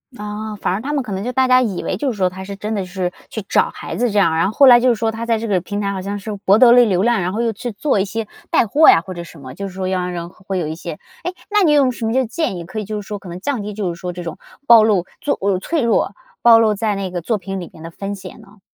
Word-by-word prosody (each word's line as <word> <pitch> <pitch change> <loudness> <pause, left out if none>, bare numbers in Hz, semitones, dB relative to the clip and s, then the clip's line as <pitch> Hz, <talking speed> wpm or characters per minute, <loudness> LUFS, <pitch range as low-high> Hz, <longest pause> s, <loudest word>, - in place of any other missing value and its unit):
哦， 210 0 -6
反 - - 0
而 195 - -1
他 285 +4 -3
们 280 -3 0
可 230 - -8
能 190 0 -3
就 245 +4 -3
大 260 +1 +3
家 255 0 +6
以 210 -8 -2
为 185 - -2
就 275 +6 -1
是 220 - -7
说 185 -2 +2
他 190 +1 -9
是 200 +1 -6
真 210 +2 -4
的 200 -3 -2
是 180 -1 -3 0.2
去 220 - -5
找 - - +3
孩 - - -6
子 245 +1 +1
这 210 - -2
样， 170 -5 +3
然 165 - +2
后 205 - -4
后 280 - +6
来 245 -2 +9
就 250 - +2
是 245 - +4
说 225 0 -1
他 225 +1 -5
在 230 -1 +1
这 225 +1 -4
个 195 -4 +2
平 205 +4 -4
台 200 -1 -1
好 190 -1 -4
像 200 +2 -4
是 210 +2 -6
博 195 +2 +6
得 240 0 +7
了 245 0 +7
流 190 -3 +1
量， 235 -1 +2
然 180 +1 -2
后 220 - -1
又 235 -1 +1
去 230 +2 -6
做 215 +2 0
一 190 - +1
些 220 +2 -4 0.2
带 - - +3
货 295 +9 +5
呀 165 - +6
或 185 +2 -8
者 170 -1 -7
什 165 - -14
么， 130 -1 -9
就 200 +7 -5
是 190 - -10
说 185 0 -3
要 185 -1 0
让 180 0 -3
人 170 -1 -5
会 190 +1 -5
有 165 - -2
一 155 - -4
些 170 0 -6 0.3
哎， 355 - -3 0.2
那 420 0 +4
你 310 -4 +4
有 275 -3 +4
什 235 -2 -5
么 220 - 0
就 260 +1 +3
建 275 - -2
议， 170 - -6
可 190 +6 -6
以 210 - -4
就 210 +1 -4
是 - - -13
说 205 0 -5
可 195 - -13
能 175 +1 -8
降 270 -1 -2
低 210 +1 -5
就 195 -4 -2
是 170 - -13
说 180 0 -5
这 175 0 -7
种 165 -2 -6 0.3
暴 235 -4 +8
露， 205 -5 +2 0.2
就 285 - 0
哦， 195 -1 +1
脆 325 - -1
弱 230 - +1 0.3
暴 235 -1 +8
露 225 -2 +3
在 210 0 -1
那 195 -2 -4
个 175 - -3
作 210 +6 -1
品 195 -1 -5
里 175 - -7
面 160 - -13
的 165 - -8
风 200 +4 -5
险 195 - -11
呢？ 210 -1 -18
205 Hz, 360 characters per minute, -19 LUFS, 185-230 Hz, 0.3 s, 来